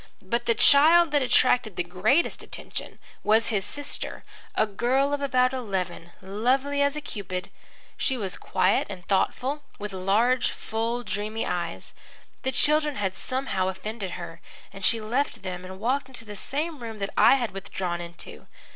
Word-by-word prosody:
But 235 +5 -1
the 230 - +4
child 320 +7 +6
that 290 -1 +3
attracted 250 -4 +3
the 175 - 0
greatest 195 - +1
attention - - -6 0.3
was 220 +2 +3
his 205 -4 0
sister, 285 +8 -3 0.3
a - - +4
girl 255 +7 +1
of 290 - -1
about 255 -2 +2
eleven, 190 -8 -3
lovely 260 +9 +1
as 285 +1 +2
a 300 - -3
Cupid. 190 -8 -5 0.5
She 265 - +1
was 195 -5 -2
quiet - - +1
and 185 -3 -8
thoughtful, 255 +9 0 0.2
with 205 -1 -6
large, 220 +7 +2
full, 230 +2 -3
dreamy 215 +1 -2
eyes. 170 -1 -3 0.5
The 265 - 0
children 300 +2 +3
had 190 -2 -1
somehow 255 -6 -1
offended 190 0 -4
her, 170 -1 -8 0.3
and 195 - -9
she 230 - +5
left 235 +2 -1
them 180 -1 -5
and 190 +1 -9
walked 255 +5 0
into 250 -4 -7
the 210 -1 -8
same 295 - -3
room 225 -2 -6
that 200 -1 -3
I - - +7
had 245 -4 -1
withdrawn 180 -2 -4
into. 170 0 -10
225 Hz, 165 wpm, -26 LUFS, 190-265 Hz, 0.5 s, I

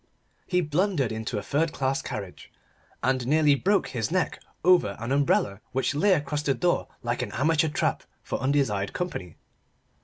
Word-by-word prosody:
He 180 -1 +2
blundered 155 - 0
into 110 0 -3
a 100 - -3
third 155 +7 0
class 135 0 0
carriage, 105 -8 -7 0.5
and 130 -1 +1
nearly 150 0 +4
broke 195 +8 +1
his 115 -4 -2
neck 185 +1 -1 0.2
over 175 - +4
an 120 +3 -4
umbrella 130 -7 +2
which 130 +2 0
lay 190 +7 +4
across 150 -2 -1
the 140 -2 +1
door 175 -1 +1 0.2
like - - -1
an - - -4
amateur 155 +3 +2
trap - - 0 0.2
for - - -3
undesired 130 -8 0
company. 95 - -4
140 Hz, 160 wpm, -26 LUFS, 120-165 Hz, 0.5 s, nearly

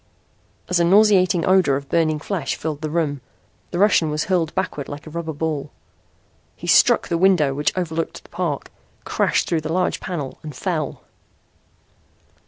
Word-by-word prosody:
As 180 -3 +1
a - - +4
nauseating 185 -2 +4
odor 185 -7 +4
of 140 0 -5
burning 155 -1 +1
flesh 155 -1 -3
filled 155 -1 -4
the 155 - -3
room, 150 -4 -1 0.5
the 175 - -4
Russian 185 -5 +4
was 150 0 -1
hurled 175 -5 0
backward 170 -7 -3
like 145 +1 -8
a 155 - -10
rubber 165 0 -4
ball. 150 -2 -3 0.9
He - - -10
struck - - +4
the 170 - -1
window 175 -7 +4
which 145 +2 0
overlooked 165 -2 -3
the - - -19
park, - - -3 0.3
crashed - - 0
through 165 -2 0
the 155 +1 -4
large 180 +2 0
panel 150 -8 -5
and 150 -3 -8
fell! 155 -3 -3
160 Hz, 165 wpm, -21 LUFS, 150-180 Hz, 0.9 s, a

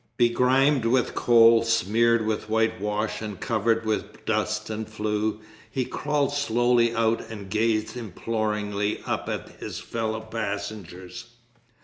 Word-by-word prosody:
Begrimed 125 +2 +3
with 125 +2 +2
coal, 115 -1 +6
smeared 115 0 +2
with 110 0 -2
whitewash, 110 -1 0
and 105 -4 -6
covered 115 0 0
with 105 -1 -3
dust 110 0 -1
and 110 0 -4
flue, 110 0 -2 0.3
he 130 -2 -1
crawled 145 0 -1
slowly 120 -3 +2
out 115 0 +1
and 100 -4 -8
gazed 110 +1 +1
imploringly 105 -2 -2
up - - -2
at - - -4
his - - -6
fellow 110 -1 -3
passengers. 100 -4 -5
110 Hz, 120 wpm, -25 LUFS, 105-115 Hz, 0.3 s, coal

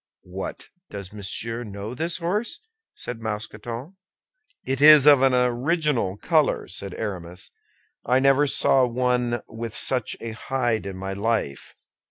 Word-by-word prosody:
"What, 95 +1 -6 0.2
does 100 -1 -8
Monsieur 115 +3 -4
know 100 +1 -7
this 165 +6 -1
horse?" 190 +7 -2 0.3
said 120 -2 -7
Mousqueton. 115 - -6 0.7
"It 135 +1 -2
is 150 -2 +9
of 145 -3 +7
an 135 -1 +4
original 125 - +1
color," 155 +4 +1
said 95 +1 -6
Aramis; 90 -4 -5 0.5
"I 125 - +2
never 135 +2 +4
saw 135 -1 +3
one 125 -1 0
with 115 0 -5
such 125 -4 +1
a 115 - -5
hide 120 -2 -1
in 95 -1 -6
my 95 +1 -4
life." 100 - -2
120 Hz, 135 wpm, -24 LUFS, 105-135 Hz, 0.7 s, is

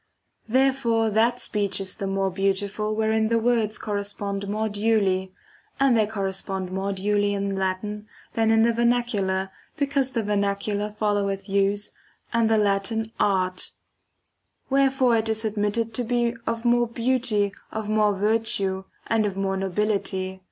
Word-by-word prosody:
Therefore 245 -3 +2
that 230 +3 +2
speech 200 -2 -1
is 190 -1 -3
the 200 -3 -3
more 195 0 0
beautiful 200 +3 -1
wherein 220 0 +1
[|the 230 +1 +2
words]] 225 -2 +1
correspond 200 -1 -3
more 215 +2 -1
duly 205 -3 +1 0.5
[]and 270 -3 +4
they 215 -2 +3
correspond 195 -2 -3
more 190 +1 -2
duly]] 205 +1 +1
in 200 0 -2
Latin 195 +3 -3 0.3
than 225 -1 +2
in 225 0 +5
the 235 0 +3
vernacular, 225 -6 +1 0.3
because 280 -3 +1
the 230 -2 0
vernacular 205 0 -1
foUoweth 205 -2 -1
use 200 +1 +1 0.4
and 230 -1 +3
the 220 - +4
Latin 210 +2 0
art; 185 -2 0 1.0
wherefore 270 -3 +3
it 220 0 -1
is 220 0 +2
admitted 215 +2 -1
to 245 - 0
be 240 0 +1
of 230 +1 -2
more 240 0 +3
beauty, 230 -4 0 0.2
of 220 -1 -4
more 210 -1 +2
virtue, 200 -2 0 0.2
and 225 -2 +1
of 195 -1 -5
more 195 0 0
nobility. 190 -1 -1
210 Hz, 145 wpm, -25 LUFS, 195-225 Hz, 1.0 s, in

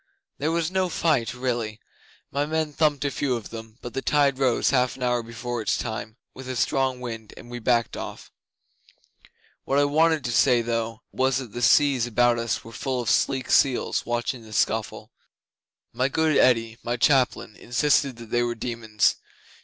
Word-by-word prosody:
'There 150 - 0
was 165 0 0
no 185 -1 +1
fight 135 -10 +1
really. 120 -4 -2 0.5
My 140 +1 0
men 155 -1 -1
thumped 150 -2 +1
a 140 - 0
few 130 -2 -1
of 115 -3 -6
them, 110 0 -9
but 120 - -7
the 135 - -2
tide 140 -2 +2
rose 130 -2 +2
half 125 -2 +2
an 130 - -7
hour 125 -1 +1
before 115 +1 -5
its 105 - 0
time, 110 -1 -5 0.2
with 130 -1 -9
a 130 - -3
strong 130 +1 0
wind, 115 -3 -7
and 120 - -12
we 120 - -5
backed 120 -1 +1
off. - - -8 1.3
What 135 - 0
I 145 - +5
wanted 160 +1 +2
to 120 - -2
say, 120 0 +4
though, 115 -1 -3
was, 130 0 +1
that 130 -5 -6
the 120 - -5
seas 135 -1 +4
about 120 0 +2
us 115 -1 -2
were 115 - -11
full 130 +2 -3
of 120 - 0
sleek 130 -2 +1
seals 135 -3 +2
watching 120 +1 -2
the 110 -1 -12
scuffle. - - -1 0.8
My 125 +3 +1
good 160 +1 +1
Eddi 115 -3 +3
my 120 +1 -2
chaplain 125 -4 +2
insisted 135 +1 +1
that 115 -1 -12
they 120 - +2
were 120 0 -1
demons. 115 -2 0
125 Hz, 185 wpm, -25 LUFS, 115-135 Hz, 1.3 s, I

